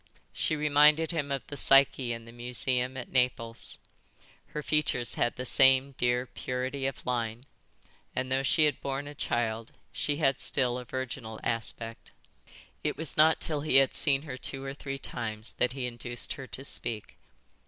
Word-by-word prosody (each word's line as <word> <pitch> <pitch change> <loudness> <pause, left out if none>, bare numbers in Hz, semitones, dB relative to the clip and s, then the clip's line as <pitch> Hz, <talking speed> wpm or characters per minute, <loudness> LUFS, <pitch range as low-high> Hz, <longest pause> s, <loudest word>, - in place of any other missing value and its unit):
She 155 - 0
reminded 150 +2 +4
him 150 -4 -2
of 135 -1 -2
the 145 - -8
Psyche 135 -3 +4
in 115 -1 -5
the 115 - -11
museum 125 +2 -1
at 125 - -7
Naples. 120 -3 -1 0.7
Her 150 - -5
features 140 -6 +1
had 120 - 0
the 125 - -5
same 130 +1 +5
dear 120 +1 +1
purity 130 +2 -3
of 135 - -6
line, 120 0 -2 0.7
and 130 0 -2
though 135 +1 +2
she 155 +3 +4
had 150 - 0
borne 140 +1 -3
a 145 - -7
child 115 -4 -2 0.2
she 145 -1 -2
had 135 -4 +2
still 125 -2 +1
a 125 - -8
virginal 120 -3 -5
aspect. 115 0 -3 0.7
It - - -1
was 160 -2 -4
not 160 +1 +5
till 150 -3 -2
he 155 - 0
had 135 -1 +6
seen 140 -2 +3
her 135 -5 -6
two 135 +1 -4
or 135 0 -4
three 135 -1 -5
times 110 -4 -5
that 125 0 +2
he 130 -2 -3
induced 120 0 -2
her 135 -3 -8
to 135 - -6
speak. 115 -6 -1
130 Hz, 175 wpm, -29 LUFS, 120-140 Hz, 0.7 s, had